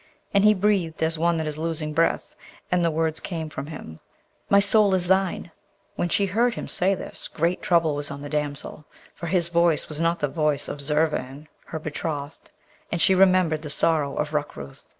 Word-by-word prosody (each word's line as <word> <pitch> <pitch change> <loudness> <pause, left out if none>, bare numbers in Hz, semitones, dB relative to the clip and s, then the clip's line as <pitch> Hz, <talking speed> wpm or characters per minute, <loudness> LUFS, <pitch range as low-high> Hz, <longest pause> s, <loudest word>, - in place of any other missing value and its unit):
And 200 0 +4
he 210 0 +6
breathed 185 -5 0
as 160 0 +1
one 170 0 +2
that 160 - -2
is 155 0 -4
losing 160 -2 -3
breath, 165 +2 +1 0.4
and 180 -1 +2
the 170 - +3
words 160 0 -1
came 160 -4 -5
from 140 -2 -6
him, 80 - -9 0.5
'My 200 - +6
soul 200 -1 +4
is 180 -1 0
thine!' 190 -2 +1 0.4
When 175 - -1
she 200 - +2
heard 230 +5 +1
him - - -5
say 190 +2 +1
this, - - -7
great 170 +3 -1
trouble 165 -3 +2
was 145 0 -2
on 140 0 -7
the - - -5
damsel, 150 0 -3 0.3
for 170 - -7
his 170 -1 +1
voice 170 -2 +2
was 155 +1 -4
not 165 +1 +2
the 145 - +1
voice 150 -1 0
of 145 - -6
Zurvan 150 -1 -1 0.2
her 160 - -5
betrothed; 155 -1 -5 0.4
and 170 - -1
she 190 - +4
remembered 185 -4 +4
the 150 - -7
sorrow 145 -2 +1
of 150 0 -2
Rukrooth. 110 - -5
160 Hz, 195 wpm, -24 LUFS, 150-180 Hz, 0.5 s, he